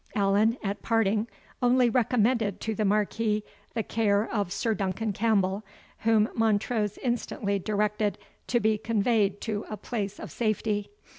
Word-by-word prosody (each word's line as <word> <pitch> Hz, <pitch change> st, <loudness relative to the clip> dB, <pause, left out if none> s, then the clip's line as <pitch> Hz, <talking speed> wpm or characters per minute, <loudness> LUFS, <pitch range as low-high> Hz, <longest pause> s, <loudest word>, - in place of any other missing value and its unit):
Allan, 205 Hz, +3 st, +3 dB
at 200 Hz, 0 st, -3 dB
parting, 220 Hz, -1 st, +1 dB, 0.3 s
only 250 Hz, 0 st, +4 dB
recommended 230 Hz, -3 st, +2 dB
to 220 Hz, -, -1 dB
the 215 Hz, -, -1 dB
Marquis 210 Hz, +1 st, +1 dB, 0.3 s
the 225 Hz, -, 0 dB
care 210 Hz, -1 st, +1 dB
of 200 Hz, -5 st, -1 dB
Sir 220 Hz, +3 st, 0 dB
Duncan 205 Hz, +1 st, -2 dB
Campbell, 200 Hz, -2 st, +1 dB, 0.4 s
whom 220 Hz, -1 st, +3 dB
Montrose 215 Hz, -1 st, +1 dB
instantly 215 Hz, -5 st, -1 dB
directed 210 Hz, 0 st, 0 dB, 0.3 s
to 240 Hz, -, +2 dB
be 215 Hz, -1 st, +2 dB
conveyed 210 Hz, -2 st, +1 dB
to 215 Hz, -2 st, -2 dB
a 215 Hz, -, -4 dB
place 205 Hz, -1 st, -4 dB
of -, -, -7 dB
safety. 215 Hz, -2 st, -1 dB
215 Hz, 140 wpm, -27 LUFS, 205-225 Hz, 0.4 s, only